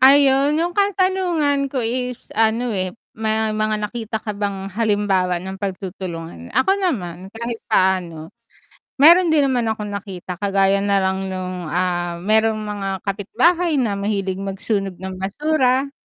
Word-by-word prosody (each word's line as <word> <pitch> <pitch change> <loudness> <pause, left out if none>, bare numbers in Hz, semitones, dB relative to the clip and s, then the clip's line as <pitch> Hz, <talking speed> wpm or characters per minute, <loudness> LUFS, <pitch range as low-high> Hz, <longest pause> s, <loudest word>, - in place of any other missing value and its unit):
Ayun, 275 +2 +5
yung 345 +2 0
katanungan 370 -8 +1
ko 260 -2 -2
is, 250 +2 -2 0.2
ano, 225 +2 +1
eh, 185 -2 -2 0.2
may 220 0 -1
mga 215 0 0
nakita 225 0 -4
ka 210 - -2
bang 200 -1 -4
halimbawa 205 -4 +1
ng 190 +2 -6
pagtutulungan? 180 - -6
Ako 320 - +3
naman 190 - -2
kahit 230 +2 -5
paano, 180 -6 +1 0.7
meron 340 +1 +7
din 300 - +4
naman 245 -3 +1
akong 215 -2 -2
nakita 190 -3 -6
kagaya 195 0 +2
nalang 195 -1 +1
nung, 185 -2 -4
ah, 175 +1 -1
merong 220 +2 +2
mga 205 -2 -4
kapitbahay 325 - +1
na 210 -5 0
mahilig 200 -2 -1
magsunog 195 0 -2
ng 190 +1 -7
basura, 265 +6 +1
205 Hz, 135 wpm, -21 LUFS, 190-250 Hz, 0.7 s, meron